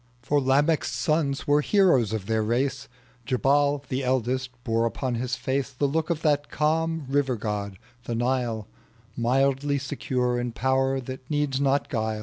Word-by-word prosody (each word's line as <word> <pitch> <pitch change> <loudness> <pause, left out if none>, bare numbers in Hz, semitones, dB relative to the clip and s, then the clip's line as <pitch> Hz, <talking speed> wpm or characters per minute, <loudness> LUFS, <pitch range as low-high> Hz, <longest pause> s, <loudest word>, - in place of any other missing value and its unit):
For 145 +4 +2
Lamech's 145 +4 +2
sons 155 -4 0
were 145 +1 +4
heroes 160 - +3
of 110 -3 -3
their 110 +1 0
race: 130 +5 -1 0.4
Jabal, 140 +3 +2
the 130 +1 -2
eldest, 130 0 0
bore 115 0 +1
upon 125 +2 -3
his 125 +1 -2
face 135 +1 -2
The 140 +1 -2
look 160 +4 -1
of 165 -2 -1
that 145 -2 +1
calm 160 0 0
river 135 -2 +1
god, 105 -3 -4 0.3
the 120 - -2
Nile, 120 -3 -1 0.5
Mildly 135 +4 +1
secure 125 -2 -1
in 120 -1 -3
power 135 +2 +1
that 130 0 -8
needs 145 -3 0
not 140 0 +2
guile. 110 -2 -2
130 Hz, 155 wpm, -26 LUFS, 120-145 Hz, 0.5 s, were